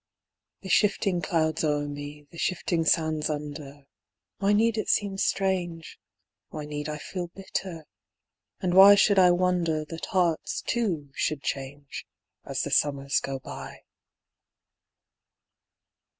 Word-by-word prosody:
The 190 - -8
shifting 195 -3 +2
clouds 160 -1 0
o'er 145 -1 0
me, 145 +1 -8
the 170 - -11
shifting 170 -2 0
sands 160 -1 +1
under; 145 -1 -6 0.6
Why 200 0 +2
need 220 +1 +2
it - - -3
seem 195 -2 +1
strange, 180 -5 -1 0.5
Why 150 -1 -6
need 150 0 -5
I 150 - -4
feel 175 +3 -5
bitter, 180 -2 -6 0.7
and 180 -2 -1
why 195 +2 +9
should 200 0 +4
I 180 -1 +7
wonder 175 -3 +1
That 165 +1 -7
hearts, 175 -4 0
too, 175 - -2
should 145 -1 -2
change 140 +1 -5 0.4
As - - -3
the - - -4
summers 140 -1 +2
go 135 0 -4
by. 130 - -9
165 Hz, 125 wpm, -27 LUFS, 150-185 Hz, 0.7 s, why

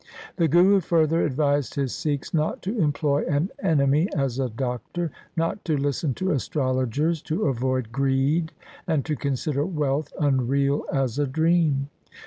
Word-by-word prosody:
The 170 -3 +3
Guru 180 +6 +5
further 165 -2 +2
advised 145 -1 0
his 135 -3 -1
Sikhs 145 -3 -3
not 155 -1 0
to 200 +6 -2
employ 150 -5 +1
an 160 +3 0
enemy 150 - +2
as 135 -2 -1
a 130 -2 0
doctor, 130 +8 -3 0.3
not 165 +5 -1
to 155 -3 +1
listen 140 -1 -1
to 190 +1 -1
astrologers, 140 +2 0
to 170 +7 -2
avoid 130 -2 -1
greed, 140 +5 +1 0.4
and 155 -5 0
to 155 - -1
consider 140 +1 -1
wealth 150 -4 -1
unreal 140 0 +1
as 135 -1 0
a 145 - +1
dream. 155 -1 +1
145 Hz, 145 wpm, -24 LUFS, 135-160 Hz, 0.4 s, Guru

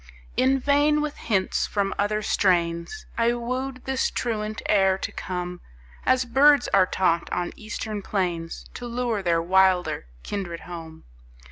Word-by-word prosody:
In 265 +1 +3
vain 290 +2 +3
with 300 -1 -3
hints 195 -4 0
from 200 -1 -1
other 210 +1 0
strains 170 - +1
I 230 +1 +3
wooed 255 +2 -4
this 265 0 0
truant 215 -2 -3
air 190 -2 +3
to - - -4
come 180 -1 -5 0.5
As 255 0 +4
birds 275 +2 +5
are 190 -2 +4
taught 170 -3 +1
on 175 0 -2
eastern 215 -1 -5
plains 175 -5 -2
To 245 - -6
lure 235 -3 -1
their 170 -2 +1
wilder 185 - +3 0.2
kindred 175 -5 -4
home. 165 -2 -9
205 Hz, 140 wpm, -25 LUFS, 180-250 Hz, 0.5 s, birds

